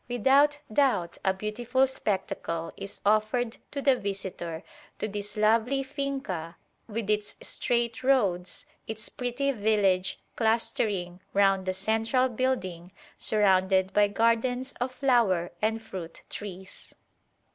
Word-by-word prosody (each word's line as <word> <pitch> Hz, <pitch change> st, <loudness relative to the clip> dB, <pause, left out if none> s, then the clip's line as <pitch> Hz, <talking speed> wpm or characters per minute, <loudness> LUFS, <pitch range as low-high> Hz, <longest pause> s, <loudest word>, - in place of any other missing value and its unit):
Without 275 Hz, +5 st, +4 dB, 0.2 s
doubt 240 Hz, -11 st, +2 dB
a 190 Hz, -, +3 dB
beautiful 230 Hz, +7 st, 0 dB
spectacle 190 Hz, -8 st, -3 dB
is 195 Hz, +1 st, -9 dB
offered 215 Hz, +3 st, +2 dB
to 280 Hz, -1 st, -5 dB
the 275 Hz, -2 st, +5 dB
visitor 190 Hz, -6 st, -5 dB, 0.3 s
to -, -, -2 dB
this 205 Hz, 0 st, -5 dB
lovely 230 Hz, +6 st, +3 dB
finca 265 Hz, -, -4 dB, 0.3 s
with 225 Hz, -1 st, -4 dB
its 210 Hz, 0 st, -1 dB
straight 235 Hz, -1 st, 0 dB
roads, 200 Hz, -10 st, +1 dB, 0.2 s
its 220 Hz, -1 st, -4 dB
pretty 250 Hz, +3 st, -1 dB
village 205 Hz, -5 st, +1 dB, 0.2 s
clustering 215 Hz, -5 st, 0 dB
round 195 Hz, -1 st, +3 dB
the 185 Hz, -, +1 dB
central 225 Hz, +6 st, +1 dB
building 190 Hz, -8 st, -2 dB, 0.2 s
surrounded 190 Hz, -2 st, +3 dB
by 205 Hz, 0 st, +5 dB
gardens 230 Hz, +4 st, +1 dB
of 250 Hz, +1 st, 0 dB
flower 235 Hz, -10 st, +2 dB
and 220 Hz, +1 st, 0 dB
fruit 180 Hz, -6 st, -8 dB
trees." 190 Hz, -2 st, -8 dB
215 Hz, 115 wpm, -28 LUFS, 190-245 Hz, 0.3 s, the